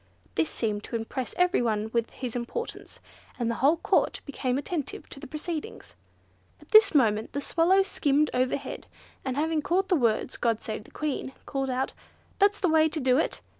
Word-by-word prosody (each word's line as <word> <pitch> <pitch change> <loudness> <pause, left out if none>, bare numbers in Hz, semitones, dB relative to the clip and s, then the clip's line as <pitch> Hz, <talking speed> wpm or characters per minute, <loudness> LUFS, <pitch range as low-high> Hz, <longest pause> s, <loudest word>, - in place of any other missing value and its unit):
This 160 -1 +1
seemed 210 -2 -2
to - - -5
impress 230 +3 -4
every 360 -2 +3
one 220 -2 -1
with 235 -1 +1
his 250 -3 -6
importance, 245 - -5 0.4
and 235 -2 0
the 230 - -5
whole 295 +5 +5
Court - - +1
became 260 -3 -1
attentive 290 0 -4
to - - -8
the 285 - -9
proceedings. 320 - -6 0.7
At - - -19
this 430 -5 +7
moment 220 -5 +2
the 285 - -1
Swallow 345 +6 +3
skimmed 300 -5 +1
overhead, 255 +2 -2 0.4
and 260 0 -3
having 315 +1 +1
caught 370 +5 0
the 365 - +4
words 235 -7 +1
"God 230 -2 0
save 215 -1 -5
the - - -15
Queen," 290 -3 -3
called 270 -1 -2
out, 260 +1 -1 0.5
"That's 405 0 +4
the 375 - +2
way 315 -1 +4
to 310 - -3
do 255 0 +3
it! - - -1
275 Hz, 185 wpm, -27 LUFS, 240-330 Hz, 0.7 s, this